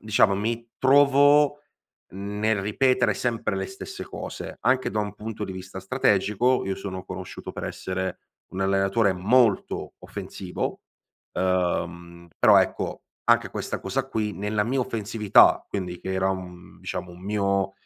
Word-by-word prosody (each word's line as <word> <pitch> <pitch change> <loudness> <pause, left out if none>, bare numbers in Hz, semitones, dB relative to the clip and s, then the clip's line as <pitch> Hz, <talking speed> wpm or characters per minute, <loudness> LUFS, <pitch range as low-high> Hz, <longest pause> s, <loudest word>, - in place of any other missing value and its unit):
diciamo, 105 -2 +3
mi 115 +3 -2
trovo 145 +2 +5 0.5
nel 105 +2 -1
ripetere 120 +2 +2
sempre 115 -3 -1
le 95 - -2
stesse 195 - -8
cose. - - -7
Anche 130 0 +2
da 105 - -2
un 105 -1 -4
punto 110 0 -5
di 95 - -6
vista 95 +1 -8
strategico, 105 +2 +2
io 95 - -1
sono 95 -1 -6
conosciuto 90 0 -7
per - - -7
essere 95 0 -4 0.3
un 95 - -4
allenatore 95 +2 +2
molto 110 +3 +2
offensivo, 90 -2 -5 0.5
uhm, 85 -2 -1
però - - +7
ecco, - - -1 0.2
anche - - +4
questa - - -4
cosa 135 0 -2
qui, 110 -4 -1
nella 105 +2 -1
mia 130 +5 -1
offensività, 110 -3 +3
quindi 90 -3 -4
che 95 - -4
era 95 0 +1
un 90 -2 -7
diciamo, 90 -1 -5
un 90 - -13
mio 100 -1 0
100 Hz, 140 wpm, -25 LUFS, 95-115 Hz, 0.5 s, però